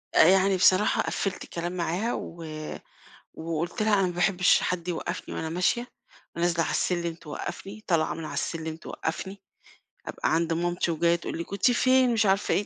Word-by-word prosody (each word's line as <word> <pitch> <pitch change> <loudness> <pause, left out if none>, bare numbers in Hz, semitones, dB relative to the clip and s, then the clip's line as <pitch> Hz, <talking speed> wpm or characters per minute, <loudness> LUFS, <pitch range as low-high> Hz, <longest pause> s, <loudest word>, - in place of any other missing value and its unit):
آآ - - +8
يعني 190 +1 +5
بصراحة 185 +3 +4
قفِّلت 195 -2 -2
الكلام 175 +1 -4
معاها 180 +6 -1
و 165 0 -6 0.9
وقُلت 165 +6 -3
لها: 215 -1 +2
"أنا 190 - +2
ما 175 - -4
باحبّش 180 +1 +3
حد 180 -1 -2
يوقّفني 175 - -4
وأنا 160 - -3
ماشية." 185 +8 0 0.5
ونازلة 170 0 +1
على - - -2
السلِّم 170 -2 0
توقّفني، 195 +7 -7
طالعة 165 -4 +2
من 165 -1 -6
على - - -6
السلِّم 160 -1 -3
توقّفني، 190 +4 -5 0.7
أبقى - - -1
عند 165 0 +1
مامتي 175 0 0
وجاية 170 +1 +2
تقول 170 - -5
لي: 170 - -3
"كنتِ 200 +7 +1
فين،" 255 0 +4
مش 220 -1 +2
عارفة 195 +1 +2
إيه، 205 - +1
175 Hz, 170 wpm, -27 LUFS, 165-195 Hz, 0.9 s, آآ